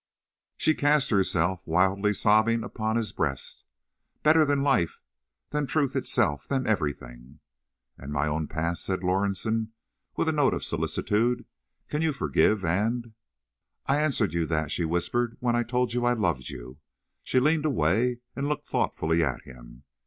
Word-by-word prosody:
She 155 - +3
cast 145 -2 +2
herself, 95 -2 +1
wildly 95 +5 +2
sobbing, 110 +3 +3
upon 110 -2 -2
his 115 -2 0
breast. 70 -5 -3 0.6
"Better 155 +1 +5
than 140 -1 +1
life—than 125 - -2
truth 145 -3 0
itself—than 130 - 0
everything." 70 - -3 0.6
"And 70 +1 -8
my 75 0 0
own 75 0 -1
past," 85 +2 -2
said 95 -1 -2
Lorison, 100 +4 0 0.4
with - - 0
a - - +3
note - - +2
of - - -4
solicitude—"can 120 +6 -2
you 160 -2 +1
forgive 110 -7 +1
and—" 110 +7 -1 0.7
"I 140 +2 +2
answered 120 - +1
you 85 -2 0
that," 75 -2 -1
she 85 - 0
whispered, 115 +8 -1
"when 120 -1 +1
I 120 - +2
told 125 0 -1
you 120 0 0
I 120 0 +3
loved 85 - -1
you." 65 +4 -9 0.4
She 130 - +1
leaned 155 +3 +2
away, 120 - +1
and 140 +3 -2
looked 150 - -3
thoughtfully 80 +1 0
at 70 -5 -2
him. - - -14
105 Hz, 145 wpm, -27 LUFS, 80-125 Hz, 0.7 s, Better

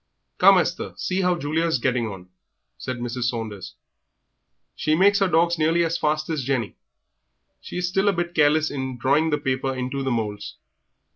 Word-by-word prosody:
"Come, - - +7
Esther, - - -1
see 185 +1 -1
how 180 -1 +1
Julia 160 +2 -1
is 160 - +1
getting 120 -2 0
on," 95 -3 -9 0.5
said 130 -2 -4
Mrs. 120 0 -3
Saunders; 110 -5 -4 1.0
"she 155 - +1
makes 200 +4 +4
her 195 - +3
dogs 170 -1 +2
nearly 165 +2 +2
as 165 0 -1
fast 155 0 0
as 155 -4 -2
Jenny. 125 -5 -2 0.8
She - - -8
is 180 0 -1
still 195 +2 +1
a - - +2
bit 175 -1 -3
careless 155 0 +3
in 130 -2 -4
drawing 140 +6 +2
the 150 - +1
paper 135 -2 -2
into 130 +2 -3
the 135 - -1
moulds. 105 -4 -3
145 Hz, 175 wpm, -23 LUFS, 125-165 Hz, 1.0 s, Come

